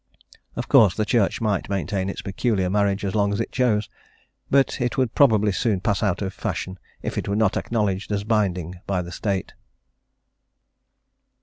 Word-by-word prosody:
Of -, -, -4 dB
course 105 Hz, -5 st, +6 dB
the 110 Hz, -, 0 dB
Church 115 Hz, -3 st, +1 dB
might 105 Hz, -4 st, -1 dB
maintain 95 Hz, 0 st, -1 dB
its -, -, -6 dB
peculiar 95 Hz, -2 st, 0 dB
marriage 100 Hz, 0 st, +1 dB
as 95 Hz, -, -2 dB
long 100 Hz, -1 st, +2 dB
as 100 Hz, -, -2 dB
it -, -, -2 dB
chose, 110 Hz, -5 st, +1 dB, 0.6 s
but 135 Hz, -1 st, +2 dB
it 125 Hz, +3 st, -1 dB
would 130 Hz, -3 st, +1 dB
probably 110 Hz, -7 st, +4 dB
soon 100 Hz, +1 st, 0 dB
pass 100 Hz, +2 st, 0 dB
out 100 Hz, -1 st, 0 dB
of 95 Hz, -1 st, -3 dB
fashion 95 Hz, 0 st, -4 dB, 0.2 s
if -, -, -2 dB
it -, -, -5 dB
were 100 Hz, -, 0 dB
not 110 Hz, -2 st, +2 dB
acknowledged 105 Hz, -3 st, -1 dB
as 100 Hz, -1 st, -1 dB
binding 95 Hz, -5 st, -1 dB
by 95 Hz, -2 st, 0 dB
the 85 Hz, -, -9 dB
State. 95 Hz, +1 st, -3 dB
100 Hz, 175 wpm, -23 LUFS, 95-110 Hz, 0.6 s, course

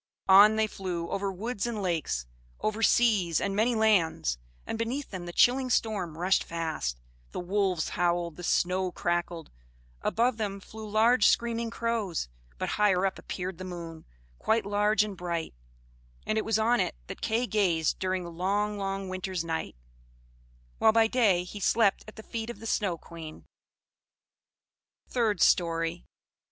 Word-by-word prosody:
On 200 Hz, +3 st, +8 dB
they 220 Hz, 0 st, +2 dB
flew 180 Hz, -5 st, -4 dB
over 195 Hz, 0 st, -1 dB
woods 220 Hz, +3 st, -3 dB
and 230 Hz, -3 st, -3 dB
lakes, 165 Hz, -, -1 dB, 0.3 s
over 215 Hz, +1 st, -2 dB
seas, 210 Hz, -9 st, +3 dB
and 200 Hz, -1 st, -2 dB
many 230 Hz, +3 st, +2 dB
lands; 180 Hz, -, +2 dB, 0.3 s
and 225 Hz, -, -4 dB
beneath 250 Hz, +5 st, -3 dB
them 180 Hz, -3 st, -6 dB
the -, -, -5 dB
chilling 255 Hz, +7 st, +3 dB
storm 200 Hz, -9 st, 0 dB
rushed 185 Hz, +3 st, +2 dB
fast, 160 Hz, -, -3 dB, 0.3 s
the -, -, -3 dB
wolves 185 Hz, -2 st, 0 dB
howled, 175 Hz, -2 st, 0 dB
the 180 Hz, -, -9 dB
snow 185 Hz, +1 st, +1 dB
crackled; 175 Hz, -2 st, -2 dB, 0.5 s
above 235 Hz, +1 st, +1 dB
them 200 Hz, -3 st, -3 dB
flew 215 Hz, +2 st, -10 dB
large 220 Hz, +2 st, +4 dB
screaming 235 Hz, 0 st, +1 dB
crows, 225 Hz, -, -2 dB, 0.3 s
but -, -, -2 dB
higher 195 Hz, -3 st, +3 dB
up 195 Hz, -, -2 dB
appeared 185 Hz, -1 st, -5 dB
the -, -, -5 dB
moon, 170 Hz, -3 st, -8 dB, 0.3 s
quite 220 Hz, -2 st, +1 dB
large 210 Hz, +1 st, +2 dB
and 205 Hz, -3 st, -6 dB
bright; 170 Hz, -2 st, -3 dB, 0.7 s
and 215 Hz, -, 0 dB
it -, -, -3 dB
was 225 Hz, -1 st, +2 dB
on 235 Hz, +2 st, +2 dB
it -, -, 0 dB
that -, -, -9 dB
Kay 230 Hz, +3 st, +1 dB
gazed 180 Hz, -8 st, +1 dB
during 185 Hz, -1 st, -1 dB
the 170 Hz, -, -7 dB
long 200 Hz, +4 st, -1 dB
long 195 Hz, 0 st, -3 dB
winter's 185 Hz, -1 st, -3 dB
night; 160 Hz, -, -3 dB, 1.0 s
while 220 Hz, -, +6 dB
by 225 Hz, 0 st, +4 dB
day 220 Hz, -7 st, +3 dB
he 190 Hz, +3 st, -8 dB
slept 200 Hz, 0 st, +2 dB
at 215 Hz, -, -11 dB
the 220 Hz, -, -10 dB
feet 225 Hz, 0 st, -5 dB
of 240 Hz, -, -6 dB
the 225 Hz, -, -10 dB
Snow 200 Hz, -6 st, 0 dB
Queen. 160 Hz, -1 st, -10 dB, 1.6 s
THIRD 220 Hz, -6 st, 0 dB
STORY. 165 Hz, 0 st, +2 dB
195 Hz, 160 wpm, -28 LUFS, 175-220 Hz, 1.6 s, On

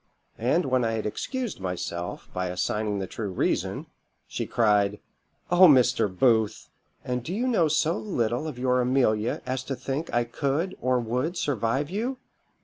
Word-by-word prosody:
And 130 Hz, +10 st, +2 dB
when 130 Hz, -2 st, +2 dB
I 115 Hz, -1 st, 0 dB
had 110 Hz, -1 st, -2 dB
excused 240 Hz, -, -3 dB
myself, 90 Hz, -2 st, -4 dB
by 90 Hz, 0 st, -2 dB
assigning 105 Hz, +3 st, -1 dB
the 95 Hz, -, -2 dB
true 105 Hz, +2 st, -5 dB
reason, 90 Hz, -, -1 dB, 0.4 s
she -, -, -4 dB
cried 105 Hz, -3 st, +2 dB, 0.5 s
'O 180 Hz, +1 st, +8 dB
Mr. 125 Hz, -6 st, +5 dB
Booth! 110 Hz, +2 st, +1 dB, 0.4 s
and 125 Hz, 0 st, -1 dB
do 160 Hz, -, -5 dB
you 225 Hz, +7 st, -1 dB
know 220 Hz, -11 st, +3 dB
so 155 Hz, +2 st, +1 dB
little 125 Hz, -, -1 dB
of 150 Hz, -5 st, -6 dB
your 125 Hz, 0 st, +2 dB
Amelia 120 Hz, -4 st, +1 dB
as 130 Hz, 0 st, -2 dB
to 135 Hz, -, -3 dB
think 140 Hz, +5 st, -4 dB
I 120 Hz, -, +2 dB
could 140 Hz, +9 st, -2 dB
or 125 Hz, 0 st, +2 dB
would 125 Hz, +9 st, -2 dB
survive 135 Hz, +3 st, -1 dB
you? 240 Hz, +7 st, -2 dB
125 Hz, 160 wpm, -26 LUFS, 110-150 Hz, 0.5 s, O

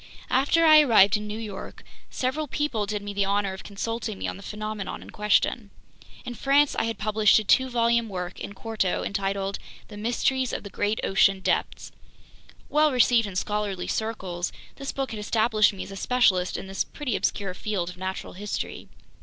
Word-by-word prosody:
After 290 Hz, +6 st, +3 dB
I 310 Hz, -1 st, +9 dB
arrived 210 Hz, -8 st, +6 dB
in 210 Hz, 0 st, -3 dB
New 210 Hz, +1 st, -4 dB
York, 215 Hz, -3 st, -7 dB, 0.3 s
several 280 Hz, +4 st, -2 dB
people 260 Hz, -8 st, -1 dB
did 210 Hz, 0 st, -3 dB
me 205 Hz, 0 st, -5 dB
the 200 Hz, 0 st, +1 dB
honor 200 Hz, 0 st, 0 dB
of 190 Hz, -, -9 dB
consulting 220 Hz, +1 st, -4 dB
me -, -, -3 dB
on -, -, -4 dB
the 195 Hz, -, -11 dB
phenomenon 215 Hz, 0 st, -5 dB
in -, -, -12 dB
question. 210 Hz, +1 st, +1 dB, 0.6 s
In 245 Hz, -, -5 dB
France 280 Hz, +4 st, +3 dB
I -, -, 0 dB
had 225 Hz, -2 st, -3 dB
published 215 Hz, 0 st, +4 dB
a 215 Hz, -, +1 dB
two 260 Hz, +5 st, +3 dB
volume 235 Hz, -1 st, +2 dB
work, 180 Hz, -2 st, -5 dB
in 200 Hz, -, -6 dB
quarto, 205 Hz, -2 st, -1 dB
entitled 195 Hz, 0 st, -2 dB, 0.3 s
The 210 Hz, -, -9 dB
Mysteries 245 Hz, +4 st, 0 dB
of -, -, -4 dB
the 200 Hz, -, -9 dB
Great 210 Hz, +2 st, -1 dB
Ocean 195 Hz, 0 st, +3 dB
Depths. 185 Hz, -, -1 dB, 0.8 s
Well 305 Hz, 0 st, +3 dB
received 240 Hz, -3 st, +4 dB
in 195 Hz, -, -8 dB
scholarly 205 Hz, -1 st, -2 dB
circles, 190 Hz, -6 st, -3 dB, 0.3 s
this 275 Hz, 0 st, -4 dB
book 270 Hz, -3 st, -3 dB
had 220 Hz, -, -5 dB
established 215 Hz, 0 st, +3 dB
me 195 Hz, -, -6 dB
as -, -, -10 dB
a -, -, -7 dB
specialist 195 Hz, -5 st, +2 dB
in -, -, -6 dB
this 195 Hz, 0 st, -2 dB
pretty 270 Hz, -7 st, -4 dB
obscure 195 Hz, -3 st, -1 dB
field 185 Hz, -3 st, -3 dB
of 180 Hz, -, -14 dB
natural 190 Hz, +1 st, -5 dB
history. 205 Hz, +2 st, -5 dB
210 Hz, 185 wpm, -26 LUFS, 195-235 Hz, 0.8 s, I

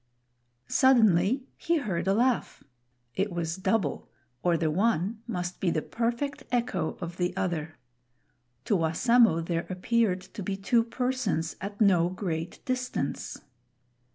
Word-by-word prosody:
Suddenly 230 Hz, -, +4 dB
he 340 Hz, 0 st, +1 dB
heard 190 Hz, -, -2 dB
a 195 Hz, -, +3 dB
laugh. 245 Hz, +2 st, 0 dB, 0.5 s
It 195 Hz, +1 st, -1 dB
was 170 Hz, -1 st, -2 dB
double, 190 Hz, +2 st, -1 dB, 0.3 s
or 175 Hz, -1 st, +2 dB
the 160 Hz, -1 st, 0 dB
one 210 Hz, +3 st, +1 dB
must 180 Hz, -5 st, -3 dB
be 185 Hz, -, +1 dB
the 155 Hz, -2 st, 0 dB
perfect 240 Hz, +5 st, -2 dB
echo 220 Hz, -9 st, -1 dB
of 170 Hz, +1 st, -5 dB
the 180 Hz, 0 st, -1 dB
other. 160 Hz, -3 st, -2 dB, 0.9 s
To 210 Hz, -, +2 dB
Wassamo 180 Hz, +3 st, +4 dB
there 170 Hz, 0 st, -2 dB
appeared 190 Hz, +1 st, +1 dB
to 190 Hz, +3 st, -9 dB
be 195 Hz, +1 st, -3 dB
two 230 Hz, +4 st, +2 dB
persons 240 Hz, -9 st, -1 dB
at 200 Hz, +1 st, -6 dB
no 180 Hz, -5 st, +5 dB
great 175 Hz, -3 st, -4 dB
distance. 250 Hz, -, -3 dB
195 Hz, 130 wpm, -28 LUFS, 170-235 Hz, 0.9 s, no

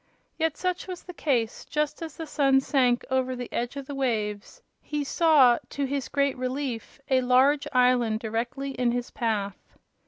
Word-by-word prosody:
Yet 320 Hz, -2 st, -1 dB
such 365 Hz, 0 st, -2 dB
was 365 Hz, -1 st, -7 dB
the 360 Hz, -, -9 dB
case; 245 Hz, -9 st, -1 dB
just 300 Hz, 0 st, -2 dB
as 320 Hz, -3 st, -7 dB
the 325 Hz, -, -5 dB
sun 275 Hz, -3 st, +3 dB
sank 255 Hz, -3 st, +2 dB
over 260 Hz, 0 st, +1 dB
the 245 Hz, -1 st, -7 dB
edge 240 Hz, +3 st, -2 dB
of 280 Hz, -1 st, -6 dB
the 285 Hz, -, -7 dB
waves 215 Hz, -6 st, -2 dB, 0.2 s
he 295 Hz, -1 st, -3 dB
saw, 285 Hz, -5 st, +5 dB
to 280 Hz, -, -2 dB
his 275 Hz, -1 st, -3 dB
great 280 Hz, -1 st, +1 dB
relief, 255 Hz, -2 st, -4 dB
a 260 Hz, -1 st, +4 dB
large 260 Hz, +3 st, +3 dB
island 250 Hz, -4 st, +3 dB
directly 235 Hz, +5 st, -3 dB
in 250 Hz, -2 st, 0 dB
his 245 Hz, 0 st, -3 dB
path. 205 Hz, -4 st, -3 dB
260 Hz, 175 wpm, -26 LUFS, 240-285 Hz, 0.2 s, saw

